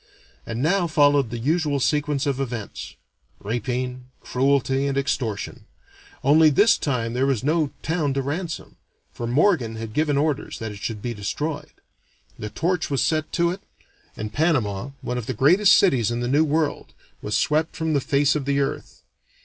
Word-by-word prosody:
And 115 +3 -3
now 175 +2 +2
followed 145 -5 +3
the 120 - -4
usual 150 +3 0
sequence 145 0 0
of 140 -2 -1
events 120 -6 -5 0.4
rapine, 125 +3 -3
cruelty, 135 +1 +1
and 140 -1 -1
extortion; 125 -6 -2 0.6
only 155 +3 +6
this 205 +10 +5
time 120 -5 -2
there 130 +2 +1
was 130 -4 0
no 155 +1 +1
town 155 -4 0
to 135 - 0
ransom, 160 +4 -5 0.4
for 120 - -5
Morgan 125 - +2
had 110 -1 -6
given 150 0 +1
orders 150 -1 -1
that 110 -2 -5
it 100 - -9
should 105 0 -5
be 120 - -2
destroyed. 145 +9 -4 0.7
The 105 - -5
torch 170 - -1
was 140 -2 +1
set 155 -1 0
to 170 -1 +2
it, 190 +2 -6 0.6
and 110 0 -5
Panama, 135 - 0
one 125 -2 -3
of 115 - -7
the 130 - -3
greatest 180 - +5
cities 130 - +3
in 120 0 -2
the 120 - -2
New 145 +5 +3
World, 155 0 -1 0.3
was 105 - -1
swept 155 +2 +1
from 160 -1 -1
the 140 - +2
face 140 +2 +2
of 145 -3 -2
the 140 0 +1
earth. 140 - -4
140 Hz, 175 wpm, -23 LUFS, 120-155 Hz, 0.7 s, only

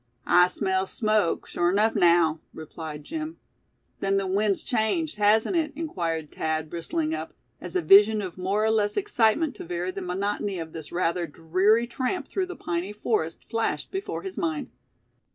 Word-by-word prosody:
"I 180 0 +6
smells 190 +1 -1
smoke, 215 -5 +1
sure 175 0 0
enuff, 210 +4 +3
naow," 170 -4 +4 0.2
replied 155 -1 -7
Jim. 315 - -5 0.6
"Then 195 0 +1
the 195 - 0
wind's 200 +1 +1
changed, 260 +6 0
hasn't 215 - +3
it?" 310 -3 0
inquired 170 - -3
Thad, 155 -1 -2
bristling 310 - -2
up, - - -5 0.3
as - - -8
a 365 - +1
vision 210 +2 +7
of 185 -4 -5
more 195 +4 0
or 220 - +3
less 210 -2 +1
excitement 315 - +2
to - - -7
vary 175 +1 -3
the 195 - -6
monotony 195 +2 -2
of 160 -2 -6
this 160 -2 -8
rather 175 0 0
dreary 185 +9 +2
tramp 255 +8 -3
through 380 -1 -2
the 365 - -7
piney 175 +3 -3
forest 210 -6 -2
flashed 225 0 -2
before 390 +1 -4
his 385 -1 -6
mind. 315 -6 -2
200 Hz, 170 wpm, -26 LUFS, 175-240 Hz, 0.6 s, vision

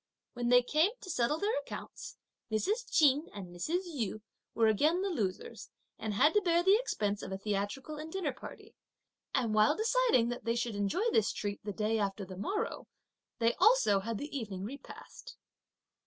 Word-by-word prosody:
When 240 -1 -2
they 245 0 +6
came 310 +8 +3
to 370 - -6
settle 290 +1 +1
their 415 +7 0
accounts - - -8 0.3
Mrs. 410 - -1
Ch'in 295 0 +4
and 195 -3 -7
Mrs. 325 - -1
Yu 230 - -4 0.3
were 230 - +3
again 305 - +3
the 395 - -1
losers 200 - -4 0.3
and 215 -2 -3
had 290 +9 +4
to 420 - +4
bear 345 -2 +2
the 385 +2 +6
expense 205 - -1
of - - -7
a 190 - -2
theatrical 205 +9 -3
and 310 +1 -7
dinner 335 -7 -2
party; - - -11 0.6
and 240 -5 +1
while 215 +7 +4
deciding 455 - +3
that 240 - -5
they 230 0 0
should 235 -1 -1
enjoy 205 - 0
this 220 - +3
treat 205 -1 -4
the 205 - -4
day 215 +2 0
after 200 -1 -2
the 185 0 -9
morrow, 405 - -3 0.5
they 230 0 +2
also 430 - +5
had 225 +3 -4
the 290 +3 -6
evening 205 -7 -4
repast. 265 +8 -10
245 Hz, 180 wpm, -32 LUFS, 210-340 Hz, 0.6 s, they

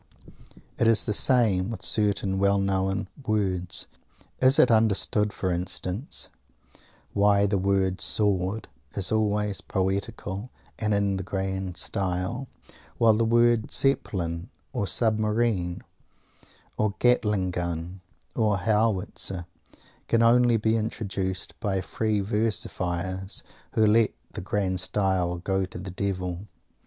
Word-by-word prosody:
It 115 - +3
is 115 -1 +4
the 105 - -1
same 110 -6 +3
with 115 - -6
certain 100 -2 +1
well 100 0 +3
known 95 0 0 0.2
words. 95 -6 0 0.6
Is 130 +3 +6
it 155 - +5
understood, 105 -1 +3
for 95 -3 -2
instance, 90 - -2 0.8
why 100 0 +4
the 100 -1 +1
word 95 -1 +1
"Sword" 100 0 +1 0.3
is 100 -2 +2
always 105 -3 0
poetical 95 +3 -3 0.3
and 105 -1 +1
in 100 -1 +1
"the 95 - -4
grand 95 -1 -3
style," 95 +7 -2 0.5
while 115 -2 +5
the 110 +2 +1
word 120 0 +3
"Zeppelin" 85 -11 0 0.2
or 100 - -1
"Submarine" 110 -3 +1 0.9
or 105 -1 0
"Gatling 105 -6 +2
gun" 85 +1 -4 0.3
or 105 -3 +2
"Howitzer" 100 -3 0 0.6
can 115 0 +3
only 120 0 +5
be 110 +1 +1
introduced 100 -4 -3
by 100 -5 -1
Free 110 +2 -1
Versifiers, 95 -3 -2 0.3
who 110 - +3
let 110 +1 +3 0.2
the - - -6
"grand 95 -1 -1
style" 95 -2 0
go 95 +2 -1
to 90 - -10
the 95 +1 -7
Devil? 95 0 -3
100 Hz, 120 wpm, -26 LUFS, 95-110 Hz, 0.9 s, Is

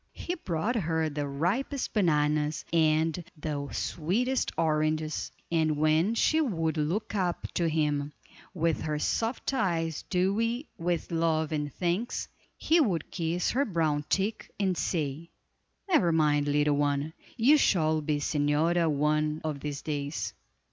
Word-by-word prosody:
He 350 - -4
brought 200 - -2
her 160 -6 0
the 145 0 -3
ripest 195 - -1
bananas, 150 -5 +1
and 160 +1 +2
the 145 -2 -4
sweetest 235 +11 -1
oranges, 155 -1 0 0.2
and 160 -2 +2
when 155 +8 +3
she 315 +7 +3
would 165 - 0
look 165 +10 -1
up 185 -4 -1
to 170 -2 +1
him, 150 -2 0 0.4
with 165 -3 0
her 155 -1 -1
soft 225 - -1
eyes 165 - 0
dewy 225 - +1
with 170 -1 -2
love 160 -2 +1
and 150 -2 -2
thanks, 180 - -2 0.3
he 330 +2 +3
would 185 - 0
kiss 170 0 -1
her 270 +3 +2
brown 160 - 0
cheek, 205 +3 -1
and 190 -3 +1
say: 160 -1 -2 0.6
"Never 305 - +3
mind, 150 -2 +2
little 145 0 +2
one, 145 +1 0 0.2
you 265 +6 +6
shall 155 - +2
be 150 0 0
señora 155 +3 +1
one 150 +1 +1
of 155 -3 -3
these 145 0 -5
days." 145 0 -3
160 Hz, 135 wpm, -29 LUFS, 150-185 Hz, 0.6 s, you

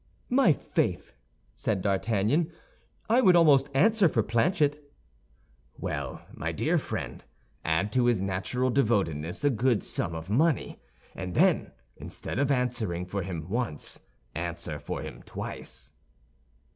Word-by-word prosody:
"My 255 -8 +5
faith," 145 - -1 0.4
said 100 -4 -1
D'Artagnan. 110 - +1 0.6
"I 235 +4 +4
would 185 -6 +6
almost 145 -5 +5
answer 205 +4 +5
for 115 - +1
Planchet." 145 - +1 0.9
"Well, 70 -3 -4
my - - -3
dear - - +1
friend, - - -5 0.4
add 80 +6 +1
to 125 0 +2
his 120 -4 +3
natural 100 +7 -1
devotedness 95 - 0
a 145 - +4
good 120 -1 +1
sum 80 - -2
of 80 +1 -6
money, 145 - +1 0.3
and 90 -2 -5
then, - - +3 0.3
instead - - -5
of 140 -1 +2
answering 120 -9 0
for 100 +2 -3
him 85 -3 -5
once, 110 - -2 0.3
answer 85 -2 -4
for - - -5
him - - -8
twice." - - -7
115 Hz, 130 wpm, -28 LUFS, 90-145 Hz, 0.9 s, would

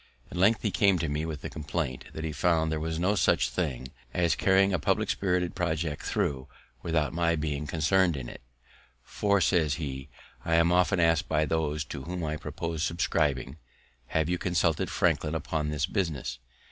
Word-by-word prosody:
At - - -6
length 100 +5 +3
he 105 - +1
came 95 +1 +3
to 80 - -1
me 75 +2 -2
with 75 -3 -5
the - - -5
compliment 75 -3 -3
that 80 - -6
he 80 - -2
found 80 +1 +1
there 80 - -1
was 80 +1 -3
no 90 +5 +2
such 95 - +2
thing 65 -8 -2 0.3
as 85 -2 +3
carrying 95 0 +3
a 90 - +1
public 70 - +1
spirited 90 -2 0
project 80 -4 -2
through 65 -2 -1 0.3
without 80 -1 0
my 85 0 +2
being 75 -1 -3
concern'd 80 +2 +2
in 65 -3 -6
it. - - -10 0.6
"For," 100 +6 +1
says 80 -5 +2
he, 70 -3 -5 0.3
"I 85 - +1
am 85 +1 +4
often 90 +1 +3
ask'd 80 -2 +3
by 75 - +2
those 75 -2 -1
to 65 - -6
whom 90 +4 -5
I 75 0 -2
propose 80 +1 -4
subscribing, 75 -5 0 0.5
Have 80 +2 0
you 90 0 -1
consulted 85 -3 +1
Franklin 75 +1 +1
upon 75 -1 -2
this 75 -2 0
business? 75 - -2
80 Hz, 185 wpm, -28 LUFS, 75-90 Hz, 0.6 s, am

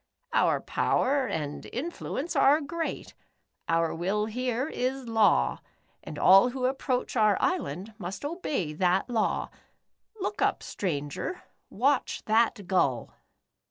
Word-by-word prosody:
" - - -54
Our - - +3
power 270 0 +1
and 150 -6 -4
influence 320 +2 -4
are 290 +3 +5
great. 325 +3 -4 0.6
Our 165 0 +2
will 195 +5 -1
here 250 +3 -2
is 260 -3 -3
law, 225 -2 +3 0.4
and - - -8
all 195 +6 +7
who 255 0 -3
approach 260 -1 -1
our 215 -4 +4
island 225 - -2
must 190 +5 -6
obey 290 - -2
that 185 +7 +1
law. 220 -3 0 0.7
Look 395 +2 -3
up, - - +1
stranger. 150 - -4 0.3
Watch 270 +4 0
that 220 -2 +2
gull." 140 - 0
230 Hz, 125 wpm, -28 LUFS, 185-270 Hz, 0.7 s, all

